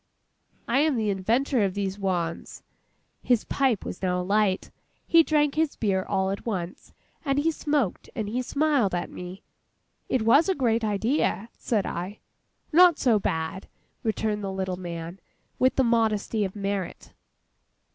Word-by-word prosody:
I 240 +3 +2
am 305 -1 +3
the 215 -3 0
inventor 230 +6 +1
of 195 -1 -1
these 200 0 -2
wans.' 175 -4 -3 0.6
His 245 -3 +2
pipe 260 -7 0
was - - -6
now 180 -1 0
alight. 195 +1 +1 0.3
He 335 - +6
drank 295 -2 +2
his 315 -1 0
beer 195 -4 0
all 190 -1 0
at 200 - -5
once, 185 -6 -5 0.3
and 275 -3 0
he 315 +3 +2
smoked 290 - -1
and 215 - -2
he 240 +5 -1
smiled 280 -7 +1
at 175 - -3
me. 180 +2 -8 0.7
'It 255 - +1
was 280 - +5
a 380 - +2
great 235 -5 +1
idea!' 220 0 0
said 215 -5 -1
I. 180 +5 -4 0.6
'Not 345 -1 +7
so 230 -5 +3
bad,' 160 +1 -3 0.3
returned 215 -1 -1
the 195 - -3
little 190 -1 -2
man, 170 0 -7 0.4
with 255 -1 +3
the 265 - +3
modesty 225 -2 +1
of 190 - -6
merit. 200 -2 -4
210 Hz, 155 wpm, -26 LUFS, 190-260 Hz, 0.7 s, Not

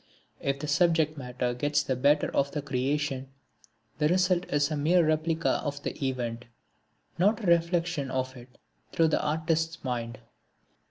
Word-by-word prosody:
If 140 0 -1
the 150 +2 -5
subject 155 +1 +2
matter 125 -2 -3
gets 145 +4 0
the 130 - -1
better 145 +4 +2
of 140 0 +1
the 150 - -3
creation, 135 0 -1 0.7
the 150 - +3
result 180 +1 +2
is 145 +1 +1
a - - 0
mere 165 +4 +3
replica 160 +1 +1
of 145 -1 -4
the - - -3
event, 125 -3 -2 0.7
not 210 +5 +2
a - - -3
reflection 170 -4 +1
of 130 0 -2
it 125 0 -14 0.3
through 165 -1 +3
the - - +1
Artist's 160 +1 -1
mind. 120 -3 -3
145 Hz, 155 wpm, -28 LUFS, 130-165 Hz, 0.7 s, the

